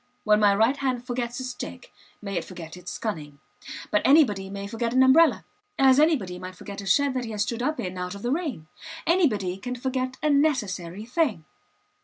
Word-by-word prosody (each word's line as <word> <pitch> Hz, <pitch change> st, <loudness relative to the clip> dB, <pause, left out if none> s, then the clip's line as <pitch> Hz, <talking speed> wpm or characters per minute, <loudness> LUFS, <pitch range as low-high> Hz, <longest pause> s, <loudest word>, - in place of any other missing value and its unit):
When 210 Hz, -1 st, +4 dB
my 205 Hz, -1 st, +5 dB
right 225 Hz, +7 st, +3 dB
hand 255 Hz, -3 st, -2 dB
forgets 245 Hz, 0 st, -3 dB
its 255 Hz, -1 st, -4 dB
stick -, -, -8 dB, 0.3 s
may 200 Hz, -1 st, -4 dB
it 170 Hz, -, -1 dB
forget 165 Hz, -1 st, -9 dB
its 180 Hz, 0 st, -7 dB
cunning. 150 Hz, -10 st, -5 dB, 0.5 s
But 210 Hz, -, +3 dB
anybody 215 Hz, -10 st, +4 dB
may 200 Hz, 0 st, -6 dB
forget 230 Hz, +3 st, -3 dB
an 260 Hz, -, +6 dB
umbrella, 310 Hz, +5 st, +5 dB, 0.3 s
as 265 Hz, 0 st, +5 dB
anybody 250 Hz, -, +2 dB
might 185 Hz, 0 st, -8 dB
forget 200 Hz, +2 st, -8 dB
a 195 Hz, -, -8 dB
shed 280 Hz, +8 st, +3 dB
that 255 Hz, -2 st, -2 dB
he -, -, -6 dB
has 210 Hz, -1 st, 0 dB
stood 235 Hz, +2 st, -4 dB
up 300 Hz, +4 st, -1 dB
in 185 Hz, -1 st, -4 dB
out 180 Hz, +1 st, -4 dB
of 200 Hz, -, -10 dB
the 240 Hz, -, -1 dB
rain. 290 Hz, -, -2 dB, 0.4 s
Anybody 215 Hz, -, +2 dB
can 250 Hz, +4 st, -4 dB
forget 255 Hz, +1 st, -3 dB
a 305 Hz, -, +3 dB
necessary 210 Hz, -, 0 dB
thing. 245 Hz, -, 0 dB
235 Hz, 200 wpm, -25 LUFS, 195-265 Hz, 0.5 s, an